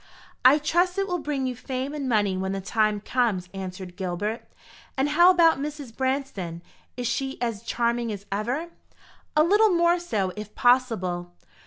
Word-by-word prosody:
"I 260 Hz, +4 st, +7 dB
trust 345 Hz, +5 st, +1 dB
it 395 Hz, -, +1 dB
will 355 Hz, -2 st, -1 dB
bring 290 Hz, -4 st, -2 dB
you 255 Hz, -1 st, -2 dB
fame 260 Hz, +3 st, -4 dB
and 280 Hz, -3 st, -3 dB
money 205 Hz, -4 st, +2 dB
when 190 Hz, +1 st, -2 dB
the 195 Hz, -, -2 dB
time 215 Hz, +1 st, 0 dB
comes," 210 Hz, -7 st, 0 dB
answered 185 Hz, -1 st, -7 dB
Gilbert. 205 Hz, +4 st, -4 dB, 0.5 s
"And 270 Hz, +2 st, +1 dB
how 345 Hz, +4 st, +6 dB
about 335 Hz, -5 st, +5 dB
Mrs. 290 Hz, -5 st, -6 dB
Branston? 260 Hz, -11 st, -2 dB, 0.3 s
Is 245 Hz, -, -3 dB
she 270 Hz, +3 st, -2 dB
as 230 Hz, -4 st, -2 dB
charming 235 Hz, 0 st, -1 dB
as 200 Hz, -1 st, -7 dB
ever?" 245 Hz, +12 st, -2 dB, 0.7 s
"A 305 Hz, -, +7 dB
little 415 Hz, +6 st, +5 dB
more 345 Hz, -1 st, +3 dB
so, 205 Hz, -, -2 dB
if 210 Hz, 0 st, -8 dB
possible. 185 Hz, -9 st, +1 dB
245 Hz, 165 wpm, -25 LUFS, 200-295 Hz, 0.7 s, I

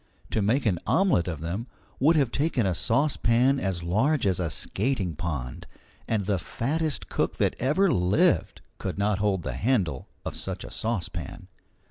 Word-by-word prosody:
To 110 Hz, -, +1 dB
make 120 Hz, +8 st, +1 dB
an 95 Hz, -6 st, +2 dB
omelette 135 Hz, -, +3 dB
of 80 Hz, -4 st, -4 dB
them 95 Hz, +9 st, -3 dB, 0.3 s
would 155 Hz, +6 st, +5 dB
have 135 Hz, -6 st, +2 dB
taken 140 Hz, -6 st, +1 dB
a 95 Hz, -, +1 dB
saucepan 125 Hz, -, +2 dB
as 95 Hz, -6 st, -2 dB
large 115 Hz, -, +1 dB
as 95 Hz, -2 st, +1 dB
a 85 Hz, -3 st, 0 dB
skating 100 Hz, -, -1 dB
pond, 70 Hz, -7 st, -4 dB, 0.4 s
and 105 Hz, -4 st, 0 dB
the 100 Hz, -2 st, +1 dB
fattest 150 Hz, -, -2 dB
cook -, -, -1 dB
that -, -, +1 dB
ever 160 Hz, +8 st, +3 dB
lived 90 Hz, +3 st, +2 dB, 0.2 s
could -, -, -4 dB
not 100 Hz, 0 st, +1 dB
hold 100 Hz, -4 st, +1 dB
the 70 Hz, -, -3 dB
handle 90 Hz, -, 0 dB, 0.2 s
of -, -, -4 dB
such -, -, -5 dB
a -, -, -9 dB
saucepan. 90 Hz, -, -4 dB
105 Hz, 165 wpm, -27 LUFS, 90-130 Hz, 0.4 s, would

